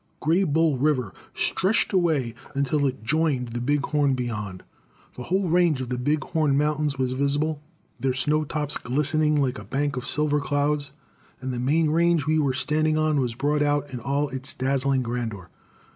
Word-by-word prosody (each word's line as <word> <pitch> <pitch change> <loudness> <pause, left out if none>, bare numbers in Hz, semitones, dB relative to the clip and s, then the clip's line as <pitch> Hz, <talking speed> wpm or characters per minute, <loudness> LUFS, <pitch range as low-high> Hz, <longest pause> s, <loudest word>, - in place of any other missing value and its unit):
Greybull 160 -3 +2
River 135 -9 +1 0.2
stretched 200 +3 +1
away 155 -10 +1 0.2
until 140 +1 +1
it 130 -4 -5
joined 135 -1 0
the 120 +1 -4
Big 145 +3 +1
Horn 145 -3 +1
beyond. 105 -7 -4 0.5
The - - -8
whole 190 +4 0
range 170 -4 +3
of 130 -2 -4
the 125 - -2
Big 150 +4 0
Horn 150 -4 +1
Mountains 150 -1 0
was 130 -1 0
visible, 145 +3 0 0.4
their 135 - +1
snow 150 +4 +1
tops 150 0 -1
glistening 150 +3 +1
like 130 -5 0
a - - -9
bank 140 +5 -2
of 125 - -4
silver 150 -1 +1
clouds, 145 0 0 0.5
and 130 0 -4
the 120 - -3
main 150 +5 +2
range 170 -2 +2
we 155 +1 +2
were 140 -4 +1
standing 155 +2 +1
on 155 -2 +2
was 125 -3 -1
brought 145 +3 0
out 145 -1 0
in 125 - -4
all 140 +4 -1
its 135 +4 -5
dazzling 135 0 0
grandeur. 115 -7 -4
145 Hz, 175 wpm, -25 LUFS, 130-155 Hz, 0.5 s, range